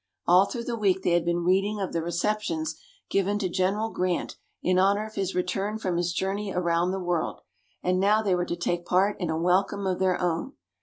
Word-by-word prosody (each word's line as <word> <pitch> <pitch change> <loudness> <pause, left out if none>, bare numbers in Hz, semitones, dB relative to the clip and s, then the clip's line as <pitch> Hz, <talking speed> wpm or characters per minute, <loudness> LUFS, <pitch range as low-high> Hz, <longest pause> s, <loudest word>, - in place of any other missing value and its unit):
All 180 +3 +6
through 235 -2 -4
the 235 0 -3
week 190 -4 +1
they - - +2
had 170 -1 +3
been 170 0 0
reading 195 +4 +2
of 195 - -3
the 165 - 0
receptions 170 -2 -1 0.4
given 195 +1 +1
to 200 -3 -1
General 195 +5 0
Grant 180 -1 -1 0.3
in 185 0 +3
honor 200 +3 +3
of 220 - -10
his 195 -2 -2
return 195 +4 -1
from 185 -5 -2
his 175 0 0
journey 195 +3 -2
around 170 -1 +1
the 190 +1 -2
world, 175 -3 -2 0.4
and 180 0 +1
now 210 +3 +3
they 195 -3 +2
were 175 0 +1
to 170 - -3
take 175 0 -2
part 190 +4 +2
in 175 -4 -2
a 160 - 0
welcome 190 +4 +1
of 185 -1 0
their 185 -1 +2
own. 175 - -1
185 Hz, 215 wpm, -26 LUFS, 175-200 Hz, 0.4 s, All